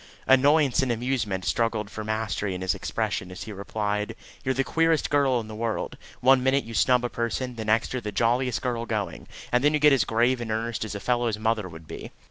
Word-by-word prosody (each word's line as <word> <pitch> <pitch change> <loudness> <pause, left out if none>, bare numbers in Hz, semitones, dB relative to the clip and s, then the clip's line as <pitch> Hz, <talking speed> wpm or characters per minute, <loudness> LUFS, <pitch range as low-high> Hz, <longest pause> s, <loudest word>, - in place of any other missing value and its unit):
Annoyance 140 +1 +4
and 130 -2 0
amusement 115 -6 -1
struggled 115 -3 0
for 110 - -5
mastery 105 -3 -2
in 90 - -6
his 95 +1 +1
expression 105 -1 -3
as 90 - -7
he 110 - -7
replied: 105 +2 -2 0.3
"You're 130 0 0
the 135 - +2
queerest 165 +2 +1
girl 140 -4 +3
in 110 - -6
the 110 - -8
world. 110 0 -3 0.3
One 130 +1 +5
minute 135 +2 +2
you 115 - -9
snub 125 +2 +3
a - - -1
person, 120 +2 -2
the 110 -1 -5
next 110 +3 +1
you 130 - -1
are - - -12
the 105 - -4
jolliest 120 +4 +1
girl 120 -2 -2
going, 100 -7 -3 0.2
and 125 +1 +2
then 150 +1 +4
you - - +1
get 150 -1 +6
as 135 - +4
grave 120 +2 +1
and 115 - -5
earnest 110 0 -2
as 110 -1 -5
a - - -3
fellow's 120 -1 0
mother 110 -3 0
would 80 -1 -12
be." - - -8
115 Hz, 230 wpm, -26 LUFS, 105-130 Hz, 0.3 s, get